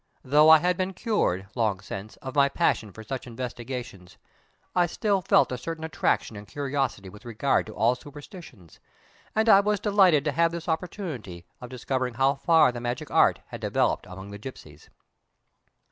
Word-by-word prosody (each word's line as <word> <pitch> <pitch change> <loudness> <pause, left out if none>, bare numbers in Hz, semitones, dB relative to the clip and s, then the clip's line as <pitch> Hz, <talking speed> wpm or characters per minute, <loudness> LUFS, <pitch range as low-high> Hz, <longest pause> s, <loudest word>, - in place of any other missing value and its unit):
Though 150 +4 +5
I 160 - +10
had 180 +3 0
been 185 +1 -2
cured, 170 - 0
long 110 -6 0
since, 100 +1 -8
of 130 -1 -6
my 140 -1 +4
passion 110 -5 0
for 110 - -11
such 130 +3 -6
investigations, 120 -5 -7 0.6
I 175 -1 +3
still 200 +3 0
felt 170 - +3
a 125 - -3
certain 165 +3 -6
attraction 160 -7 -1
and 105 0 -10
curiosity 135 -8 -3
with 105 +4 -13
regard 120 +3 0
to 110 - -10
all 115 +4 +3
superstitions, 145 - -13 0.6
and 220 +1 +2
I 195 -3 +8
was 205 0 +1
delighted 190 -8 +4
to 150 - +1
have 165 +3 +2
this 170 0 -6
opportunity 160 - -5 0.2
of 125 - -8
discovering 130 0 -3
how 135 +3 +3
far 160 0 +4
the 120 -1 -7
magic 120 +1 -4
art - - +4
had - - -8
developed - - 0
among 95 +2 -10
the 100 - -8
gipsies. 80 - -11
130 Hz, 175 wpm, -26 LUFS, 110-165 Hz, 0.6 s, I